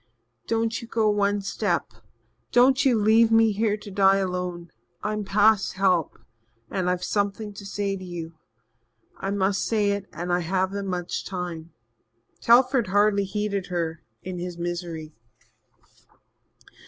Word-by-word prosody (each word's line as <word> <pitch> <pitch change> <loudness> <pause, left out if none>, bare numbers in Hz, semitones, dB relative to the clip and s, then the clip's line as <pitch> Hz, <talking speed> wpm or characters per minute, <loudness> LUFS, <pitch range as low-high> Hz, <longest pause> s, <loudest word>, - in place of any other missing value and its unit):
"Don't 225 0 0
you 235 - -9
go 225 -2 +1
one 205 0 +1
step 195 - -2 0.6
don't 260 +3 +5
leave 225 -1 +4
me 225 -1 +5
here 210 0 0
to 205 -1 -11
die 195 0 +4
alone. 180 -2 -3 0.3
I'm 210 0 -2
past 205 +1 +3
help 185 -4 +1 0.5
and 185 -2 -1
I've 180 0 -1
something 205 +1 -2
to 200 - -10
say 200 0 -2
to 190 - -8
you. 170 -2 -7 0.8
I 195 - -4
must 195 -1 0
say 210 -3 +1
it 200 -1 -3
and 175 +2 -3
I 175 - +2
haven't 190 +3 -1
much 180 -2 -3
time." 175 -3 -6 0.7
Telford 250 -1 +4
hardly 205 +1 +3
heeded 200 -1 -2
her 165 -2 -3 0.2
in 185 -1 -5
his 175 0 -5
misery. 170 -3 -5
195 Hz, 135 wpm, -25 LUFS, 180-210 Hz, 0.8 s, don't